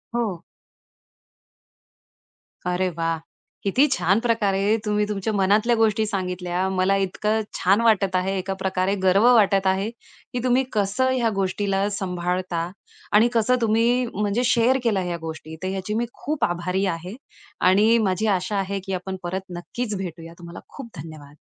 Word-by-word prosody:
हो. 210 -8 -1 2.2
अरे 180 +1 0
वाह! 165 0 0 0.5
किती 250 +9 +3
छान 185 +1 +2
प्रकारे 215 -3 +1
तुम्ही 210 0 +1
तुमच्या 210 +1 -2
मनातल्या 205 +4 +3
गोष्टी 220 -1 +2
सांगितल्या, 180 -3 -2
मला 190 +1 +2
इतकं 210 +4 -1
छान 195 +5 +2
वाटत 205 -5 +3
आहे 190 +1 0
एका 195 +1 -3
प्रकारे 190 +1 0
गर्व 190 +3 +4
वाटत 195 -4 +4
आहे, 190 +3 +1
की 245 +1 -10
तुम्ही 255 +1 +3
कसं 215 +6 +1
ह्या 245 -3 +1
गोष्टीला 195 +1 0
सांभाळता 180 -3 -2 0.4
आणि 215 +3 +5
कसं 235 +2 +3
तुम्ही 230 +3 +2
म्हणजे 210 +4 0
शेअर 245 +2 +3
केला 215 -5 +2
ह्या 175 -1 -3
गोष्टी 160 -1 -7
तर - - -1
याची 190 +2 -3
मी 235 - 0
खूप 305 +1 -4
आभारी 180 +3 -1
आहे 180 +2 -4 0.5
आणि 215 +5 +5
माझी 215 0 0
आशा 200 0 0
आहे, 195 +1 -2
की 195 - -4
आपण 190 +1 -4
परत 185 +2 -3 0.2
नक्कीच 215 +5 -4
भेटूया, 165 -3 -7
तुम्हाला 170 0 -9 0.2
खूप 270 -4 -8
धन्यवाद. 150 -2 -12
195 Hz, 150 wpm, -23 LUFS, 185-220 Hz, 2.2 s, आणि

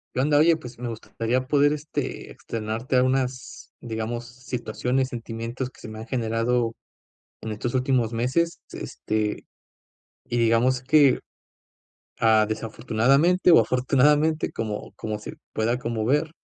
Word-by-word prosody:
¿Qué - - 0
onda?, 145 +2 +3
oye, 165 +1 +5
pues 125 -5 -10
me 120 0 -4
gustaría 115 +3 -2
poder, 145 0 +4
este, 150 0 -4
externarte 115 +3 -3
a 125 - +5
unas, 130 -1 -2
digamos 115 +1 -4
situaciones, 125 +1 -2
sentimientos 115 +1 -5
que - - -21
se - - -9
me 110 0 -8
han 110 - -7
generado 115 -1 0 0.7
en 110 - -5
estos 120 +3 -3
últimos 125 -3 +1
meses, 130 +9 0
s - - -9
este, 110 -1 -2 0.8
y 120 - -2
digamos 120 +2 +3
que, 140 0 +5 1.0
ah, 110 -1 +5
desafortunadamente 125 +11 +2
o 165 - +8
afortunadamente 145 +5 +2
como 105 -2 -5
como 105 -1 -4
se - - -8 0.2
pueda 115 +3 0
como 115 -3 -2
ver, 150 +6 +1
125 Hz, 140 wpm, -25 LUFS, 115-135 Hz, 1.0 s, o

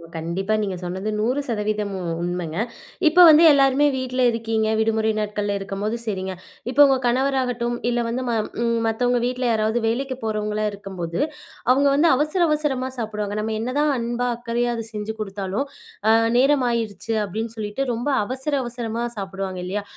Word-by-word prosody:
கண்டிப்பா, 170 +6 -2
நீங்க 195 -3 -2
சொன்னது 185 +4 -4
100% 215 -4 -1
உ - - -5 0.2
உண்மங்க. 175 -2 -3 0.5
இப்ப 355 +3 +7
வந்து, 315 +1 +8
எல்லாருமே 275 0 +4
வீட்ல 255 0 -2
இருக்கீங்க. 225 -1 -1
விடுமுறை 220 0 +2
நாட்கள்ல, 205 -1 -2
இருக்கம்போது 200 +3 -3
சரிங்க. 190 -4 -3 0.4
இப்ப 265 +3 -3
உங்க 270 -1 +3
கணவராகட்டும், 245 -2 0
இல்ல 240 0 0
வந்து 240 +3 -2
ம - - +1 0.3
ம் 235 0 +1
மத்தவங்க 245 +2 +1
வீட்ல 250 +1 -2
யாராவது 220 +1 +1
வேலைக்கு 260 +3 -1
போறவங்களா 215 -1 -1
இருக்கம்போது, 190 -4 -5 0.5
அவுங்க 280 +2 +4
வந்து, 305 +4 +4
அவசர 305 +6 0
அவசரமா 285 -4 0
சாப்பிடுவாங்க. 210 -2 -3
நம்ம 220 +1 -2
என்னதான் 285 +6 +1
அன்பா, 240 +1 -1
அக்கறையா 240 0 -1
அத 230 - -4
செஞ்சு 210 +1 -4
குடுத்தாலும், 200 +3 -3 0.4
அ, - - +7 0.3
"நேரமாயிருச்சு" 235 -6 +1
அப்படின்னு 220 +4 -4
சொல்லிட்டு, 215 +4 -3
ரொம்ப 240 +5 -2 0.2
அவசர 265 +5 -3
அவசரமா 235 -1 -3
சாப்பிடுவாங்க 195 -1 -4
இல்லையா? 200 +3 -3
225 Hz, 145 wpm, -22 LUFS, 205-255 Hz, 0.5 s, வந்து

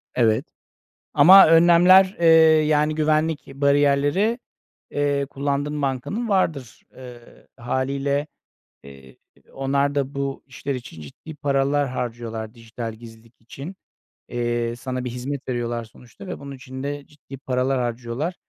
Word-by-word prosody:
Evet. 115 +2 +2 0.7
Ama 185 +7 +8
önlemler, 175 +4 +6
eee 170 - +3 0.4
yani 150 0 +1
güvenlik 155 -1 0
bariyerleri, 145 - +2 0.5
eee, 145 -1 0
kullandığın 145 +1 -2
bankanın 140 - -3
vardır, 155 - -1
eee, 125 -2 -14
hâliyle. 140 +4 -2 0.6
Eee, 70 -1 -15 0.4
onlar 140 +1 -1
da 140 0 -2
bu 140 0 -4
işler 135 +1 -5
için 120 -10 -10
ciddi 110 - -11
paralar 140 0 0
harcıyorlar 115 -3 -5
dijital 115 -1 -7
gizlilik 115 +1 -16
için, 140 +10 -9 0.5
eee, 120 -1 -2
sana 130 +1 -5
bir - - -3
hizmet 130 +3 -6
veriyorlar 120 -1 -3
sonuçta 120 - -15
ve - - -6
bunun 140 -1 -9
için 130 0 -9
de 145 0 -5
ciddi 145 -2 -13
paralar 130 0 -1
harcıyorlar. 120 +7 -3
135 Hz, 125 wpm, -22 LUFS, 120-145 Hz, 0.7 s, Ama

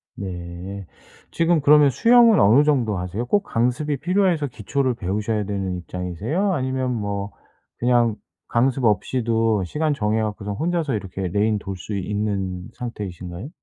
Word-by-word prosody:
네. 90 +1 -7 0.4
지금 165 -1 +2
그러면 145 0 +6
수영은 230 - +5
어느 115 +8 +6
정도 125 -9 +1
하세요? 90 +6 -3
꼭 205 +11 +1
강습이 125 +4 0
필요해서 175 -1 +1
기초를 130 +2 -1
배우셔야 105 +1 -2
되는 95 -2 -3
입장이세요 90 - -2
아니면 130 -3 -1
뭐 100 -2 -3 0.5
그냥 120 -2 +2 0.3
강습 130 +2 +1
없이도 115 -1 +1
시간 150 - -1
정해 110 -4 0
갖고서 105 -1 -4
혼자서 160 +3 -1
이렇게 95 -2 -4
레인 105 +4 +1
돌 95 -1 -6
수 100 +3 -6
있는 95 -2 -3
상태이신가요? 95 - -6
110 Hz, 325 characters per minute, -22 LUFS, 100-140 Hz, 0.5 s, 그러면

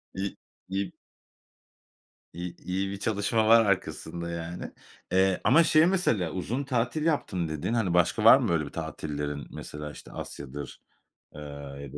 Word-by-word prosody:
İ 95 +1 -3 0.3
i 95 0 -2 1.4
i 85 0 -6
iyi 95 +2 -1
bir 100 - -6
çalışma 110 +1 +1
var 115 0 +7
arkasında, 85 -3 -2
yani. 85 +1 -5 0.4
Eee, 95 0 +3
ama 155 +7 +6
şey 155 0 +5
mesela 125 - +1
"uzun 115 +9 -2
tatil 135 +3 -1
yaptım" 95 - 0
dedin, 80 +9 -2
hani, 100 -7 +1
başka 90 -1 +2
var - - +10
mı, - - -1
böyle, 80 -3 +1
bir - - -7
tatillerin? 75 -2 -4
Mesela, 75 0 -7
işte, - - -12
Asya'dır, 70 0 -7 0.5
eee, 75 - -8
ya 70 -1 -8
da - - -6
90 Hz, 150 wpm, -28 LUFS, 75-110 Hz, 1.4 s, var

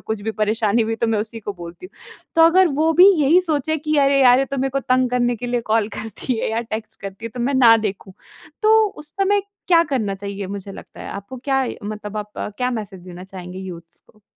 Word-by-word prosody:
कुछ 220 -1 -3
भी 220 - -2
परेशानी 215 +1 +1
हुई, 225 0 -2
तो 230 - 0
मैं 225 -2 +1
उसी 225 +2 -5
को 205 - -5
बोलती 175 - -10
हूँ। - - -21 0.4
तो 330 - +5
अगर 355 +2 +6
वो 320 +1 +3
भी 360 +4 +7
यही 305 +6 +5
सोचे 315 -3 -1
कि 305 +1 -1
अरे 275 0 +4
यार! 250 -1 +6
ये - - +1
तो 275 - -5
मेरे 270 +1 0
को 275 +1 -1
तंग 255 0 +1
करने 245 -1 +1
के 245 - -6
लिए 245 0 0
कॉल 220 -2 0
करती 225 +4 -4
है - - -1
या 225 +1 -1
टेक्स्ट 220 -1 -7
करती 195 +3 -8
है - - -4
तो 250 - -5
मैं 265 +4 0
ना 235 -3 +7
देखूँ। 200 -3 -4 0.5
तो 435 +1 +5 0.3
उस 300 - -12
समय 400 +1 +2 0.3
क्या 335 -2 +6
करना 215 -7 0
चाहिए 200 0 -6
मुझे 200 0 -7
लगता - - -12
है? - - -7
आपको 200 +7 -8
क्या 270 -1 +1 0.2
मतलब 210 0 -6
आप 210 0 -5
क्या 250 +5 -3
मैसेज 210 -6 -6
देना 180 0 -10
चाहेंगे 185 -1 -9
यूथ्स 170 -3 -10
को? 215 - -27
225 Hz, 240 wpm, -20 LUFS, 205-270 Hz, 0.5 s, भी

